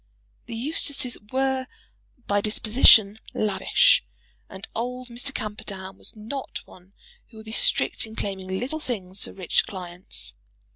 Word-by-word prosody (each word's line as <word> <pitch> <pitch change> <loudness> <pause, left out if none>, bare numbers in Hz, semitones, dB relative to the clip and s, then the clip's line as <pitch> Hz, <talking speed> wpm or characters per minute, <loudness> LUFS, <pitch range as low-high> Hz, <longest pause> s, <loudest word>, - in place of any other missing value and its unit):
The 230 - -5
Eustaces 270 0 0 0.2
were 265 0 +1 0.6
by 205 0 +2
disposition 215 -1 +6 0.2
lavish, 210 - +4 0.5
and 190 +1 -8
old 250 +2 -3
Mr. 245 +4 -2
Camperdown 205 -5 -5
was - - -6
not 225 +6 -6
one 185 +2 -17 0.3
who 225 - -16
would 220 - -11
be 220 - -7
strict 225 - +2
in 220 - -11
claiming 190 -3 -3
little 250 +12 -2
things 200 -9 -4
for - - -6
rich 185 -3 +1
clients. 180 -1 -6
220 Hz, 135 wpm, -25 LUFS, 195-250 Hz, 0.6 s, disposition